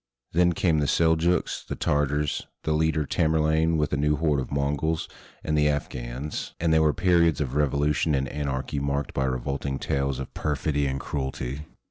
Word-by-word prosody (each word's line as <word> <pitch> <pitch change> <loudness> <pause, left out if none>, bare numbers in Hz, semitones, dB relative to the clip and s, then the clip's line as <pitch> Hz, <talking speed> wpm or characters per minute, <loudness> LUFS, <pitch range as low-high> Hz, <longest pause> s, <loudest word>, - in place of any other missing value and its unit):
Then 90 +1 +3
came 80 -2 +2
the 75 - +1
Seljooks, 85 +3 +2
the - - -3
Tartars, 75 0 0 0.2
the 80 - -1
leader 80 -1 +1
Tamerlane 80 +2 +2
with 75 -2 0
a - - +2
new 75 +1 +2
horde 75 -2 +1
of 65 - -5
Mongols, 70 +3 0 0.4
and 75 - 0
the 75 0 +3
Afghans; 65 0 -4
and 80 -1 +2
there 80 - +5
were 80 -1 +4
periods 85 -1 +3
of 70 -4 -2
revolution 75 +1 +1
and 70 0 0
anarchy 70 0 -3
marked 70 +1 -2
by 65 - 0
revolting 65 +2 -2
tales 70 -1 -1
of 65 - -6
perfidy 75 -2 -1
and 65 0 -2
cruelty. 65 +1 -4
75 Hz, 170 wpm, -26 LUFS, 70-80 Hz, 0.4 s, there